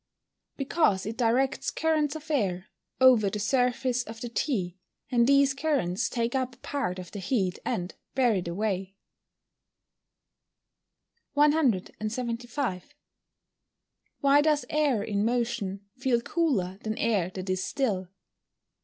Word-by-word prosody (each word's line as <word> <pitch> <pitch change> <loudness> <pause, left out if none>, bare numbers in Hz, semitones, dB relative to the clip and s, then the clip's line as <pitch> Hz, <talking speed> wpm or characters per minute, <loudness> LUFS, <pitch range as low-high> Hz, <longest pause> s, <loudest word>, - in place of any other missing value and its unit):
_ - - -46
Because 275 - +1
it 220 +2 -4
directs 250 +3 +1
currents 310 -2 0
of 315 0 -7
air 195 -8 0 0.3
over 250 -6 +6
the 210 - -4
surface 250 +3 +1
of 225 -2 -9
the 240 - -5
tea, 195 - -2 0.3
and 240 -1 +4
these 280 0 +5
currents 275 - 0
take 235 -1 -1
up 260 -1 -1
a - - -29
part 260 -8 -3
of 180 -2 -8
the 205 - -6
heat 190 -2 -1
and 180 +1 -2 0.2
bear 250 -4 +4
it 185 -4 -2
away. 195 +1 -2 2.4
175. 240 - 0 1.3
_Why 280 +1 +6
does 300 -1 +2
air 290 -8 +2
in 205 -1 -1
motion 225 -4 -1
feel 260 -3 +2
cooler 235 - 0
than 220 0 -3
air 205 -6 +1
that 185 0 -5
is 185 0 0
still? 200 -9 -1
235 Hz, 125 wpm, -28 LUFS, 195-275 Hz, 2.4 s, over